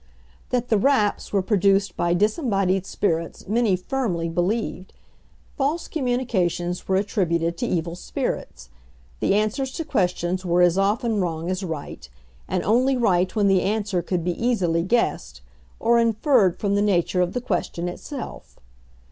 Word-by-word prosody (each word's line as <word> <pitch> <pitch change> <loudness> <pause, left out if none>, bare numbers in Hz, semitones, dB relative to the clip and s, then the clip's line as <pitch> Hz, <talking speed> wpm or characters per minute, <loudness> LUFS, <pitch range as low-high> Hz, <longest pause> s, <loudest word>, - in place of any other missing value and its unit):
That 245 -1 -1
the 215 - +3
"raps" 215 -4 +1
were 195 -2 +1
produced 195 0 +2
by 175 0 +1
disembodied 195 - +1
spirits 165 -4 -2
many 220 -1 +2
firmly 180 -5 -2
believed. 185 +3 -2 0.6
False 295 +4 -1
communications 220 - -1
were 190 - +2
attributed 170 -4 0
to - - -1
evil 170 0 -2
spirits. - - -5 0.5
The - - +2
answers 215 +6 0
to 330 - -4
questions 185 - 0
were 175 0 +3
as 175 -1 +4
often 210 +2 +1
wrong 170 0 -2
as 185 +1 -3
right; 160 - -6 0.4
and 185 -1 -1
only 255 +5 +3
right 185 -5 +2
when 205 -2 +3
the 190 -2 +4
answer 205 -2 0
could 175 -1 -2
be 175 +1 0
easily 185 -9 +1
guessed, 230 +7 -1 0.4
or 235 +1 +3
inferred 230 - +3
from 200 -1 -1
the 205 - +2
nature 185 -3 +2
of 180 0 0
the 250 - -1
question 180 -5 -2
itself. 260 - -8
195 Hz, 150 wpm, -23 LUFS, 175-230 Hz, 0.6 s, as